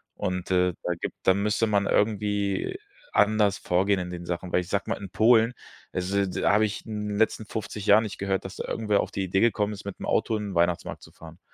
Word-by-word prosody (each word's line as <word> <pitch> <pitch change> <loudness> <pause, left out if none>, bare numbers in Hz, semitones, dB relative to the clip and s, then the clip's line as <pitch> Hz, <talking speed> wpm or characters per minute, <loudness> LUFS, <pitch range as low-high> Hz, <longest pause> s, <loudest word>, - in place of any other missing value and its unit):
Und, 90 0 -3
äh, 90 -1 +3
da 90 - 0
gibt - - -4
da 95 - +5
müsste 105 +3 +1
man 100 -2 +1
irgendwie 105 - 0 0.3
anders 105 -2 +3
vorgehen 95 +2 +1
in 90 0 -5
den 85 0 -7
Sachen, 90 +1 -4
weil - - +3
ich 90 - -9
sage 100 - -1
mal, - - -1
in 100 -2 -8
Polen, 115 +3 +4 0.4
also 100 +2 0
da 90 - +1
habe 110 +1 +4
ich 105 -1 -5
in 105 -1 -4
den 100 - -3
letzten 110 0 +1
50 105 -1 -5
Jahren 105 +2 +6
nicht 105 - -6
gehört, 95 -1 -1
dass 95 - -7
da - - -4
irgendwer 105 -2 0
auf - - -5
die 95 - -2
Idee 95 +1 0
gekommen 105 -2 +2
ist, 100 - -9
mit 100 - -7
'nem - - -5
Auto 110 - +1
in 105 -1 -4
den 95 - -7
Weihnachtsmarkt 85 0 0
zu - - -14
fahren. 80 +1 -13
100 Hz, 240 wpm, -26 LUFS, 90-105 Hz, 0.4 s, Jahren